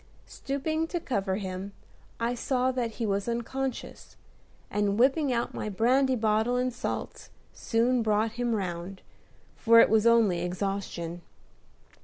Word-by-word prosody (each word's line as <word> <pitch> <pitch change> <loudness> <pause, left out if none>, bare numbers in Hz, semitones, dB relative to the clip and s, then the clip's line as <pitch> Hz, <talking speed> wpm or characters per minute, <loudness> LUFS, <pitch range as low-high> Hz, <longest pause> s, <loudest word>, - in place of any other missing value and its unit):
Stooping 315 +4 -3
to 345 - -3
cover 195 - -1
him, 190 0 -5 0.5
I 235 +1 0
saw 255 +1 0
that 240 -3 -2
he 230 - -3
was 200 +1 -1
unconscious, 255 +3 -4 0.6
and, 205 -1 0
whipping 270 +3 +3
out 235 -1 -1
my 215 - -4
brandy 255 +6 +2
bottle 220 +1 +1
and 250 0 0
salts, - - -5 0.2
soon 240 +2 +1
brought 215 0 +1
him 240 0 -1
round, 185 -1 -5 0.5
for 230 0 +5
it - - +6
was 220 +1 +4
only 220 -7 +4
exhaustion. 180 -2 -3
230 Hz, 135 wpm, -28 LUFS, 200-250 Hz, 0.6 s, it